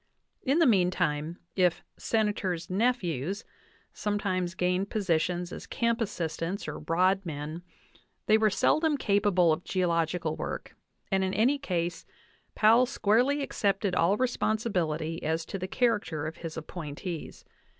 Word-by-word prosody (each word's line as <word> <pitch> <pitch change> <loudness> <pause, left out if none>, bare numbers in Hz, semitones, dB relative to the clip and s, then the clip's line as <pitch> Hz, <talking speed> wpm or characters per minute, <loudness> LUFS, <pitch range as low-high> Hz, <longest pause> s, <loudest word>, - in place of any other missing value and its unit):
In 275 +3 +1
the 335 - +5
meantime, 180 - +1 0.2
if 180 -3 +2
"Senators' 195 -6 -1
nephews" 195 - 0 0.5
sometimes 185 -4 -1
gained 180 +2 0
positions 175 -3 0
as - - -8
camp 235 0 0
assistants 170 -2 -3
or - - -5
rodmen, 165 -3 0 0.6
they 215 - +5
were 220 0 +4
seldom 305 - +2
capable 200 - +3
of 165 - -4
geological 170 -3 0
work, - - -5 0.4
and 190 0 +2
in 190 0 -1
any 255 +8 +3
case 175 -9 -2 0.5
Powell 230 +4 +5
squarely 250 +5 +2
accepted 200 -6 0
all 180 +3 +3
responsibility 190 -10 -1
as 160 +1 -1
to 195 - -5
the 185 - -3
character 205 - 0
of 160 +2 -5
his 165 -2 -7
appointees. 160 +1 -6
185 Hz, 125 wpm, -29 LUFS, 165-215 Hz, 0.6 s, the